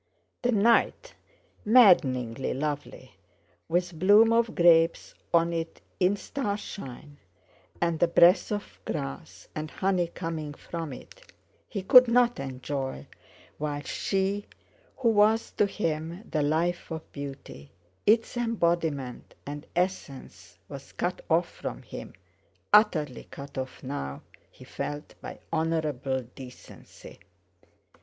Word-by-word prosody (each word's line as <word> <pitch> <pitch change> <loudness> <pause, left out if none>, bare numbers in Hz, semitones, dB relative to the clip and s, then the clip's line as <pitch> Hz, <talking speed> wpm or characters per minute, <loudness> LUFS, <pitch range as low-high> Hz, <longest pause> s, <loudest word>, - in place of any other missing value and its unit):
The 245 - +1
night, 235 - +2 0.5
maddeningly 135 - +4
lovely, 145 -4 -4 0.6
with 175 -1 -1
bloom 210 +5 +6
of 230 -1 +2
grapes 165 -1 +4 0.2
on 170 0 +3
it 165 0 -4 0.2
in 185 +2 +3
starshine, 200 - -6 0.6
and 170 -2 0
the 175 - +4
breath 170 +4 +5
of 205 -1 -5
grass 70 0 -6
and 155 0 -5
honey 185 -1 0
coming 160 -3 -5
from 165 -2 -6
it, - - -13 0.4
he 200 -3 -4
could 250 +5 +8
not 245 0 +3
enjoy, 130 - -4 0.5
while 145 -1 -3
she 195 +5 -1 0.5
who 250 -4 +2
was 220 +1 +3
to 205 - +2
him 165 +1 -3
the 155 - +1
life 165 +4 0
of 160 -1 -7
beauty, 135 - -8 0.4
its 225 +3 +3
embodiment 170 - -1
and 145 +1 -7
essence, 175 -7 -4
was - - -10
cut - - -2
off - - +3
from - - -7
him, - - -9 0.6
utterly 160 - +3
cut 140 0 -10
off 130 0 -6
now, 70 - -5 0.3
he - - -16
felt, 145 +1 -6
by - - -8 0.2
honourable 150 -5 -1
decency. 130 -2 -13
165 Hz, 115 wpm, -27 LUFS, 145-200 Hz, 0.6 s, could